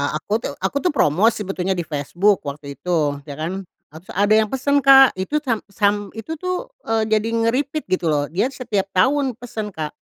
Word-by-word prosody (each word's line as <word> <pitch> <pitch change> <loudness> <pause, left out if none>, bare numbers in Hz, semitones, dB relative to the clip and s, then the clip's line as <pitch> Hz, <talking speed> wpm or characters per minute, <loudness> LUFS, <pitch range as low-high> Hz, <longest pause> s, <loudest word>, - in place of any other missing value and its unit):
Aku 155 - -7
tuh - - -3
aku - - 0
tuh 360 - +2
promosi 210 - +3
sebetulnya 190 -1 -2
di 175 - -2
Facebook 170 +7 +1
waktu 140 +1 -6
itu, 180 - -8 0.4
ya 145 - -6
kan. 160 +4 -3 0.4
Nah 155 - -11
terus 175 - -13
ada 205 +2 +3
yang 220 - +1
pesan 275 +4 +1
Kak. 270 -1 +8
Itu 190 +11 -2
sam 235 -6 0
sam 205 0 +2 0.2
itu 225 +8 -7
tuh, 365 +1 -3 0.2
eee, 225 -1 +1
jadi 215 0 +2
nge-repeat 260 +7 0
gitu 185 -2 0
loh 150 -2 +2
dia 190 +8 +1
setiap 225 -8 -2
tahun 265 +5 +2
pesan 220 -4 -6
Kak. 155 -1 -4
210 Hz, 195 wpm, -21 LUFS, 180-260 Hz, 0.4 s, Kak